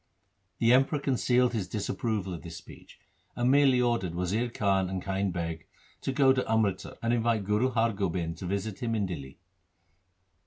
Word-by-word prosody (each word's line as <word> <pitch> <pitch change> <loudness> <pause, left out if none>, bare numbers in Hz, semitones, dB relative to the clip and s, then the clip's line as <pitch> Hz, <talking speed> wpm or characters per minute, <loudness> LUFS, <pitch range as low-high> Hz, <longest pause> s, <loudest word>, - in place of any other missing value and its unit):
The 115 +1 +4
Emperor 135 +4 +3
concealed 125 -2 +2
his 105 -6 -2
disapproval 105 -1 -2
of 85 - -7
this 85 -1 -8
speech, - - -14 0.4
and 120 +1 +2
merely 135 -2 +5
ordered 120 -8 0
Wazir 100 +7 -1
Khan 95 -4 +1
and 95 0 -2
Kind 95 +1 -1
Beg 85 -3 -4 0.3
to - - -2
go 130 0 +4
to 130 - 0
Amritsar 105 -4 0
and 115 +1 +2
invite 115 -2 +1
Guru 105 +6 +1
Har 115 -2 +1
Gobind 85 -4 -2
to 90 - -5
visit 100 +2 -3
him 115 -3 -1
in 105 -2 0
Dihli. 70 -7 -7
105 Hz, 170 wpm, -29 LUFS, 95-120 Hz, 0.4 s, merely